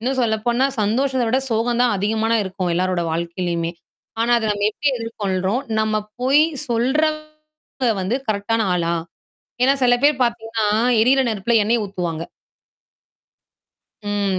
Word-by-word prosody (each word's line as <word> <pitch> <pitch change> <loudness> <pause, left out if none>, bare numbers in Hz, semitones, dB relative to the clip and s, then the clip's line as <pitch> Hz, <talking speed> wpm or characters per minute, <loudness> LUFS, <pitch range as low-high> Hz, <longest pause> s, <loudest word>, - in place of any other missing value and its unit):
இன்னும் 260 +3 -2
சொல்லப்போனா, 235 +3 +1
சந்தோஷத்தை 255 +4 +1
விட 255 +3 +2
சோகம் 235 +2 0
தான் 240 -4 +2
அதிகமா 220 +3 0
இருக்கும், 190 -2 -3
எல்லாரோட 185 0 0
வாழ்க்கையிலுமே. 170 0 -2 0.5
ஆனா 235 +1 +2
அத 225 - -4
நம்ம 205 0 0
எப்படி 285 +7 -1
எதிர்கொள்றோம்? 205 -1 -2 0.2
நம்ம 215 0 0 0.3
போய் 275 +4 +5 0.3
சொல்றவங்க 310 +1 -2
வந்து 190 +7 0
கரெக்ட்டானா 215 +1 0
ஆளா? 170 -1 0 0.7
ஏன்னா 270 - +5
சில 245 -1 +5
பேர் 285 -3 +3
பாத்தீங்கன்னா, 225 -2 -2 0.3
எரியிற 265 +4 +4
நெருப்புல 220 +2 0
எண்ணெய 230 0 +1
ஊத்துவாங்க. 175 -4 -4 1.9
ம். 200 -2 0
225 Hz, 125 wpm, -20 LUFS, 195-250 Hz, 1.9 s, போய்